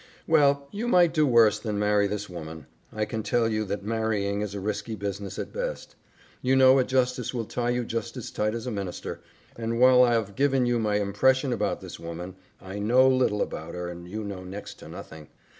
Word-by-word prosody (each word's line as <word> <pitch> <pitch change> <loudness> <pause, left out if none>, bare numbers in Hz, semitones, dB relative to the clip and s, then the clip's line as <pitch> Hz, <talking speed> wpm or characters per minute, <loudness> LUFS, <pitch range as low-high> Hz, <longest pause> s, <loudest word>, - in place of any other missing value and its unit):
"Well, 140 -3 +3
you 220 +4 -3
might 175 -7 +4
do 155 -3 +3
worse 115 -4 +5
than 105 -2 -3
marry 105 0 +2
this 105 +1 -4
woman. 80 -3 -8 0.3
I 110 0 -1
can 110 +1 -4
tell 115 +2 +1
you 110 -1 0
that 100 0 -4
marrying 105 -2 -1
is 100 -1 -4
risky 105 +3 -3
business 100 -1 -5
at - - -5
best. - - -5 0.5
You 130 +1 +2
know 130 0 +6
a - - +4
justice 125 -1 0
will 115 -2 -2
tie 120 +2 -2
you 120 0 0
just 115 +2 -4
as 125 - -6
tight 105 +1 -1
as 115 - -5
a 125 - -3
minister, 100 -4 -5 0.3
and 115 0 -3
while 125 0 +7
I've 115 -5 +2
given 135 -2 +2
you 120 -1 +1
my 105 -2 0
impression 130 +7 +2
about 105 -3 -1
this - - -9
woman, 85 +2 -7 0.3
I 95 +2 -7
KNOW 125 +5 +5
little 130 -5 +2
about 80 +3 -7
her 90 0 -4
and 85 0 -9
you 110 +3 -4
know 100 -3 -6
next 95 +3 -8
to - - -11
nothing." 80 -2 -10
110 Hz, 210 wpm, -26 LUFS, 100-125 Hz, 0.5 s, while